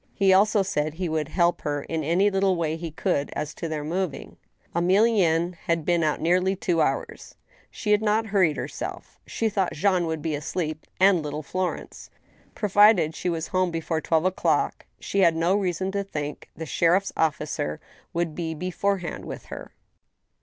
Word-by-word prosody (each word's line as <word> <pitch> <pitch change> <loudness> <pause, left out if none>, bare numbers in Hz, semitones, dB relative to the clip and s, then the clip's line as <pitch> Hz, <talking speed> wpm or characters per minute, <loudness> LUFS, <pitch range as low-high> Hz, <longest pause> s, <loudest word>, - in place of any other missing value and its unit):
He 195 -1 +4
also 205 +1 +4
said 155 -5 -2
he 180 +1 -2
would 155 -2 -1
help 170 +2 +1
her 145 -1 -2
in 160 -1 -3
any 180 +7 +2
little 195 -1 +2
way 160 -2 -1
he 165 0 -5
could 160 -2 -1
as 150 +1 -3
to 170 - -5
their 155 -2 -3
moving. 175 +1 -3 0.4
Emilienne 180 -2 +3
had 165 -2 0
been 175 -1 +2
out 155 -2 +1
nearly 180 +4 +2
two 175 -3 0
hours. - - -2 0.3
She 210 - -3
had 210 0 +4
not 220 +1 +2
hurried 190 -7 +2
herself. - - -6
She 225 - -1
thought 195 -4 0
Jean 180 0 +1
would 160 -2 -3
be 160 -2 -1
asleep, 155 +1 -4
and 190 -2 +5
little 150 +1 -5
Florence. 185 +4 -4 0.5
Provided 205 -6 +4
she 180 - -3
was 165 -1 -3
home 185 -1 +1
before 165 -1 -2
twelve 160 +2 +1
o'clock, 185 0 0
she 200 - -2
had 170 -4 +5
no 170 +4 +2
reason 190 -1 -1
to 200 0 -1
think 150 -6 -6
the 160 - -6
sheriff's 175 +5 +2
officer 150 - -1 0.3
would 170 -2 -1
be 160 -1 -4
beforehand 185 +2 -2
with - - -7
her. - - -8
175 Hz, 175 wpm, -25 LUFS, 160-190 Hz, 0.5 s, and